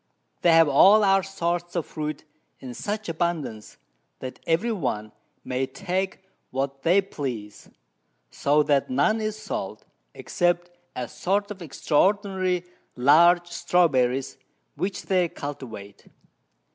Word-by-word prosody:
They 170 - +5
have 165 -1 +6
all 195 +10 +6
our 195 -1 +4
sorts 175 -2 -3
of 170 -4 -1
Fruit 155 0 -5 0.3
in 125 -2 -8
such 210 - -4
abundance, 160 -10 -3 0.4
that 130 -1 -8
every 170 +9 +1
one 110 - -3 0.3
may 130 +1 -2
take 190 +4 -3 0.2
what 135 +1 -3
they 180 +4 +4
please; 125 - -6 0.6
so 150 +2 +2
that 145 - +1
none 225 -3 +2
is 215 -1 -2
sold, 215 0 -5 0.3
except 175 0 0 0.2
a 125 -1 -3
sort 200 - -1
of 195 -2 -8
extraordinary 185 +3 +1 0.3
large 170 +7 +5
Strawberries, 135 -8 +1 0.4
which 185 +6 -3
they 180 -3 +1
cultivate. 115 -10 -8
170 Hz, 120 wpm, -25 LUFS, 135-190 Hz, 0.6 s, have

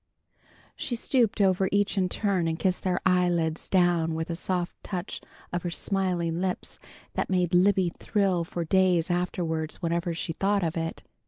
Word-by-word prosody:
She 240 - -2
stooped 230 -2 +1
over 190 -1 +3
each 205 +1 +2
in 185 -2 +1
turn 190 -5 0
and 160 0 -1
kissed 185 +1 0
their 185 -1 0
eyelids 175 -3 +1
down 175 -3 +2
with 160 +1 -3
a - - -2
soft 180 0 -2
touch 185 0 -5 0.3
of 175 - -1
her 175 - -3
smiling 175 -2 -1
lips 185 -1 -3 0.3
that - - -2
made 180 -2 +1
Libby 185 0 +4
thrill 190 -3 0
for 170 0 -4
days 180 -1 +3
afterward, 165 -3 -1
whenever 170 -1 -1
she 165 0 -3
thought 200 +3 +1
of 165 0 -1
it. 165 -1 -3
180 Hz, 165 wpm, -27 LUFS, 170-190 Hz, 0.3 s, Libby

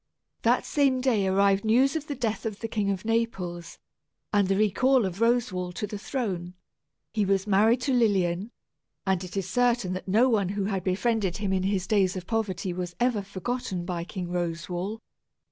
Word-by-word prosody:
That - - +2
same 275 -3 +2
day 235 -7 +2
arrived 195 +1 +3
news 255 +6 +3
of 310 -1 -3
the 285 - -3
death 225 -2 -2
of 210 -2 -6
the 225 - -2
King 210 -3 -1
of 195 +1 -2
Naples, 195 -7 -2 0.6
and 205 -2 +3
the 195 - +2
recall 245 +4 +3
of 190 +2 -4
Roswal 230 -7 +1
to 210 - -3
the 210 0 -6
throne. 185 -8 -3 0.6
He 215 -2 +1
was 195 0 +1
married 215 +4 +3
to 270 +1 0
Lilian; 200 -4 +2 0.6
and 190 -2 +1
it 185 +2 -7
is 190 -2 -1
certain 240 -3 +1
that 185 - -6
no 220 +7 +4
one 210 -7 +2
who 200 0 -2
had 195 -2 -2
befriended 195 0 0
him 200 -2 -1
in 190 - +1
his 190 -1 0
days 195 -3 +2
of 185 -1 -5
poverty 195 -4 -2
was 175 -1 -5
ever 245 -4 +2
forgotten 195 -1 -4
by 175 -2 -3
King 180 0 -6
Roswal. 175 +4 -3
200 Hz, 185 wpm, -27 LUFS, 185-230 Hz, 0.6 s, no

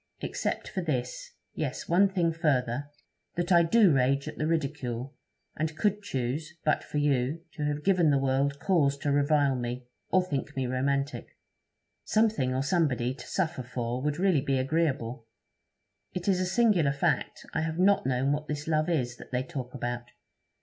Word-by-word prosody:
Except - - -2
for 190 - -3
this 125 -7 -3 0.2
yes, - - -3
one 190 +4 +4
thing 175 -4 +1
further 145 -4 0 0.5
that 175 +2 -1
I 170 -1 +7
do 190 +1 +5
rage 135 +1 +2
at - - -7
the 155 - 0
ridicule, 140 -5 -2 0.4
and 155 0 -2
could 210 +1 +1
choose, 155 0 -3
but 155 - +2
for - - -5
you, 145 +1 +1
to 150 - -4
have 150 0 -2
given 180 -5 +4
the 140 - +4
world 135 +1 +1
cause 145 -7 +2
to 145 0 -1
revile 145 -1 +3
me, 125 0 -4 0.2
or 185 -1 +4
think 150 -3 -3
me 135 -1 -1
romantic. 140 +3 -2 0.7
Something 215 - +2
or 130 +1 0
somebody 140 -6 +1
to 130 - -11
suffer 160 -8 -1
for 125 0 -3
would 150 +1 -1
really 180 -5 +3
be 135 -1 0
agreeable. 130 -5 -1 0.9
It 180 +1 -4
is 190 -2 +3
a 185 - 0
singular 185 -8 +3
fact, 145 - -1
I - - 0
have 160 0 -2
not 195 +2 +4
known 130 +2 +1
what 150 +1 -2
this 150 +1 -4
love 155 0 +1
is, 125 -7 0
that - - -12
they 125 0 0
talk 130 -1 -6
about. 120 -1 -4
145 Hz, 175 wpm, -28 LUFS, 130-165 Hz, 0.9 s, I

